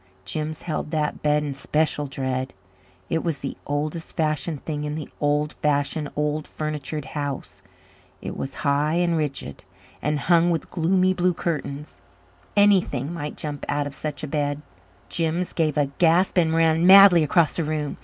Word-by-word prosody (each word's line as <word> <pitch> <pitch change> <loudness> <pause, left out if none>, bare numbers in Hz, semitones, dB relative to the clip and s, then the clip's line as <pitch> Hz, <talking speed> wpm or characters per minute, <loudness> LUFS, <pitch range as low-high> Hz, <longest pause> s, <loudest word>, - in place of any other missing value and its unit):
Jims 155 +7 -3
held 155 -2 -3
that 155 -1 -1
bed 150 0 +2
in 145 -2 -3
special 150 +1 0
dread. 130 -1 -3 0.5
It 165 - -1
was 165 -4 -1
the 135 - -4
oldest 150 +3 -3
fashioned 155 -1 -1
thing 150 -2 -3
in 150 0 -3
the 155 -3 -6
old 150 +1 +1
fashioned, 145 0 0
old 150 +1 -1
furnitured 150 -1 -4
house. 145 -3 -5 0.6
It - - -6
was 135 - -5
high 145 +3 +2
and 175 -1 +2
rigid, 145 - -3 0.4
and 150 0 0
hung 170 0 +4
with 165 -3 -2
gloomy 185 +2 +2
blue 180 -1 +1
curtains. 150 -3 -4 0.6
Anything 180 -8 +3
might 150 -3 -5
jump 145 -2 -4
out 145 0 0
of 145 - -6
such 150 +1 -5
a - - -2
bed. 145 0 -2 0.4
Jims 170 +1 -1
gave 155 -3 0
a 145 - +3
gasp 175 +2 +4
and 165 -3 +3
ran 165 +1 +3
madly 195 -3 +9
across 160 +1 +2
the 170 - +1
room. 150 -1 -3
150 Hz, 165 wpm, -24 LUFS, 145-165 Hz, 0.6 s, madly